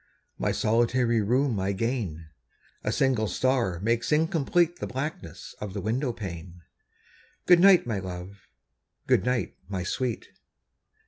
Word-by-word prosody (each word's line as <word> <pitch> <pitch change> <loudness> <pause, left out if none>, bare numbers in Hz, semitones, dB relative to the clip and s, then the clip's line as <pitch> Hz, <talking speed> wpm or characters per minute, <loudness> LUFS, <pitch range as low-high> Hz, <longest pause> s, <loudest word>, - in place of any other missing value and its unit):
My - - +1
solitary 120 +1 +2
room 125 +1 +1
I 95 +1 0
gain. 100 -7 -3 0.6
A 105 - 0
single 130 -4 +1
star 120 -8 0
makes 115 +4 0
incomplete 165 +2 +2
The - - -4
blackness 130 - -6
of 105 -2 -6
the - - -2
window 120 +7 -1
pane. 90 -5 -8 0.8
Good 180 -1 +7
night, 190 0 +6
my 110 -5 -2
love! 95 +1 -8 0.6
good - - +3
night, 125 -1 -1
my 95 -3 -3
sweet! 120 +5 -3
115 Hz, 130 wpm, -27 LUFS, 95-130 Hz, 0.8 s, Good